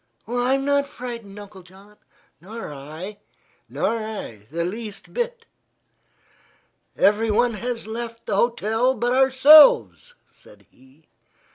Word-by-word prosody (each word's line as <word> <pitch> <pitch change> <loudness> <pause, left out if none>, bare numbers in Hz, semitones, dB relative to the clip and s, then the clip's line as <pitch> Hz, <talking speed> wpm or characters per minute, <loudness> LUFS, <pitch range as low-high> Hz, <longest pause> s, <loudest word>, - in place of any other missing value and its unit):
"I'm 250 +3 0
not 285 0 +1
frightened, 235 -6 -9
Uncle 205 -2 -12
John." 190 +3 -19 0.5
"Nor 210 -3 -8
I." 160 +9 -9 0.5
"Nor 230 - -1
I, 200 - -8
the 170 +2 -3
least 210 +2 -7
bit." 480 -1 -4 1.5
"Everyone 225 +3 +2
has 230 +2 -5
left 230 +1 -7
the 205 - -2
hotel 235 +3 +1
but 240 +2 -1
ourselves," 275 - +5 0.2
said - - -20
he. 130 +4 -24
225 Hz, 110 wpm, -22 LUFS, 195-250 Hz, 1.5 s, ourselves